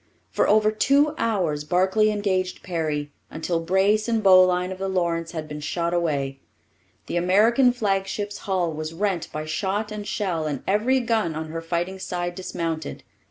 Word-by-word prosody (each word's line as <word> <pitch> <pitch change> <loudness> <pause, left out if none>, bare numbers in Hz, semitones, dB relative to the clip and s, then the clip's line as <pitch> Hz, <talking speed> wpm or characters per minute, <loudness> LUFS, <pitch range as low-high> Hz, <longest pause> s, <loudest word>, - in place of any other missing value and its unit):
For - - +1
over 215 0 +4
two 280 +7 +3
hours 175 -10 0
Barclay 190 +6 +2
engaged 190 -3 -1
Perry, 155 -4 -2 0.2
until 165 +1 -2
brace 195 +6 +2
and 225 -2 0
bowline 185 -1 +5
of 185 - -7
the 195 - -2
Lawrence 170 -3 -1
had 155 -2 -5
been 150 0 -6
shot 170 +3 -2
away. 140 -6 -1 0.7
The - - -3
American 220 +8 +4
flagship's 205 -2 -2
hull 180 -4 +1
was 155 +1 -5
rent 190 -2 -1
by 155 0 -4
shot 200 +6 -2
and 210 -1 -6
shell 170 -6 -1
and 145 -3 -4
every 235 +7 +2
gun 225 -9 0
on 160 0 -5
her 165 +1 -4
fighting 175 +3 -3
side 175 -1 -3
dismounted. 165 -4 -4
185 Hz, 160 wpm, -24 LUFS, 165-210 Hz, 0.7 s, bowline